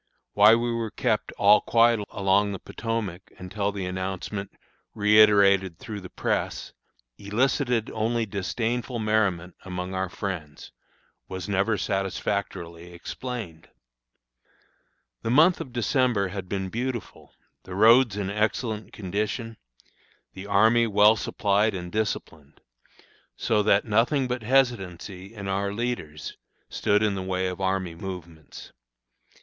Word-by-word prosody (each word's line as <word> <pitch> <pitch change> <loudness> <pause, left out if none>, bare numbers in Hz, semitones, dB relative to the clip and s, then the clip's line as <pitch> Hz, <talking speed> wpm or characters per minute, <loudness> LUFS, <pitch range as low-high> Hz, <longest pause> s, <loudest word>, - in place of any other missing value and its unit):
Why 105 +2 +7
we 120 +1 -1
were 115 -1 -2
kept - - -1
"all 105 +1 +5
quiet 115 -1 +4
along 100 +1 +1
the 95 - -6
Potomac," 110 -6 -5
until 100 +2 -3
the 100 -2 -4
announcement, 95 +2 -4 0.4
reiterated 100 -3 +5
through 110 -6 -7
the 90 - -10
press, - - -2 0.5
elicited 120 +2 0
only 115 +1 0
disdainful 115 +5 -2
merriment 100 -5 0
among 90 0 -5
our 95 0 -2
friends, 85 -7 -6 0.6
was 95 -2 -6
never 100 +2 +1
satisfactorily 90 -3 -3
explained. 90 -1 -7 1.5
The 115 - -3
month 160 +9 +5
of 130 - -7
December 120 -4 +1
had 95 -1 -6
been 95 -1 -3
beautiful, 120 +2 -5 0.3
the 90 - -9
roads 115 +1 +5
in 100 -1 -2
excellent 105 +1 -2
condition, 105 +4 -3 0.8
the 95 +2 -9
army 110 +4 +4
well 105 +1 +5
supplied 105 0 +1
and 90 -1 -6
disciplined, 85 -8 -4 0.8
so 105 -2 +1
that 100 -1 +3
nothing 120 +5 +2
but 125 -1 -3
hesitancy 100 -6 0
in 100 -2 -6
our 100 +1 -1
leaders 105 -9 -4 0.3
stood 105 0 +1
in 105 -2 +2
the 95 - -3
way 95 0 -2
of 90 +1 -4
army 95 -2 -1
movements. 85 -3 -9
100 Hz, 120 wpm, -26 LUFS, 95-115 Hz, 1.5 s, Why